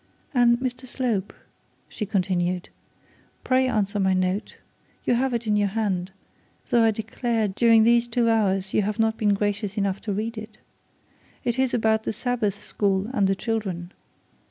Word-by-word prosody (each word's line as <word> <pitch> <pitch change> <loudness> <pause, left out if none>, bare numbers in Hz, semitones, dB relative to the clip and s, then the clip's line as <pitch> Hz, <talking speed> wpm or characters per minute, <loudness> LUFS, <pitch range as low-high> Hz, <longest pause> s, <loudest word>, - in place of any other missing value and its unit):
'And 240 -2 +4
Mr 255 0 -4
Slope,' 235 -6 -2 0.5
she 210 - -5
continued, 180 -2 -1 0.7
'pray 260 0 +2
answer 210 -4 0
my 190 -1 +2
note. 185 +2 -1 0.5
You - - +3
have 260 +2 +1
it 235 -1 -2
in 210 -1 +1
your 205 -1 +2
hand, 195 -3 -1 0.6
though, 235 - +4
I 225 - +5
declare 220 +1 -1
during 225 +3 +4
these 235 +1 +4
two 235 0 +1
hours 195 -4 +1
you - - +3
have 210 +1 -2
not 225 -1 +2
been 210 -2 +2
gracious 205 0 -2
enough 195 -1 -1
to 215 - -4
read 220 +3 -3
it. 215 0 -10 0.9
It 240 +1 -1
is 260 -2 +2
about 220 -1 +1
the - - -1
Sabbath 225 -4 -1
school 200 0 -1
and 200 -6 +2
the 195 - +1
children. 190 -6 -3
215 Hz, 165 wpm, -24 LUFS, 195-235 Hz, 0.9 s, I